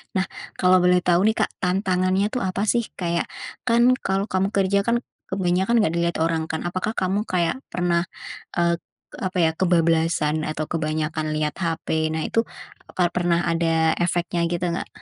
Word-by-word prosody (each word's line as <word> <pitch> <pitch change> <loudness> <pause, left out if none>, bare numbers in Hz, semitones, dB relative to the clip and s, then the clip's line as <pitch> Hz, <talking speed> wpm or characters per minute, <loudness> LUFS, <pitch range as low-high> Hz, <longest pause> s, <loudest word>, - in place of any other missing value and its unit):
Nah, 190 - +2 0.4
kalau 185 0 +5
boleh 180 0 +5
tahu 180 +3 +3
nih, 220 - +2
Kak, - - -1
tantangannya 185 +1 +1
tuh 250 - -1
apa 185 +2 -1
sih 235 -1 +1 0.2
kayak 170 -2 -1 0.4
kan 235 0 +4 0.2
kalau 195 +1 0
kamu 190 +1 +2
kerja 195 0 +3
kan 235 +1 +1 0.2
kebanyakan 190 +3 +1
nggak 160 - +1
dilihat 170 0 0
orang 165 -1 0
kan, 160 - -3
apakah 185 +5 -2
kamu 195 +3 0
kayak 175 +5 0
pernah, 175 -1 0 0.5
eee, 170 0 +2 0.4
apa 185 0 -3
ya, 160 - +4
kebablasan 165 -3 +2
atau 155 0 -2
kebanyakan 155 -1 -1
lihat 150 -1 -1
HP, 160 -1 -1
nah 160 0 -2
itu 230 - +1 0.5
apa 180 -1 +2
pernah 175 -1 +2
ada 165 -1 +2
efeknya 175 0 0
gitu 175 +1 -1
nggak? 170 - -3
175 Hz, 165 wpm, -23 LUFS, 165-190 Hz, 0.5 s, kalau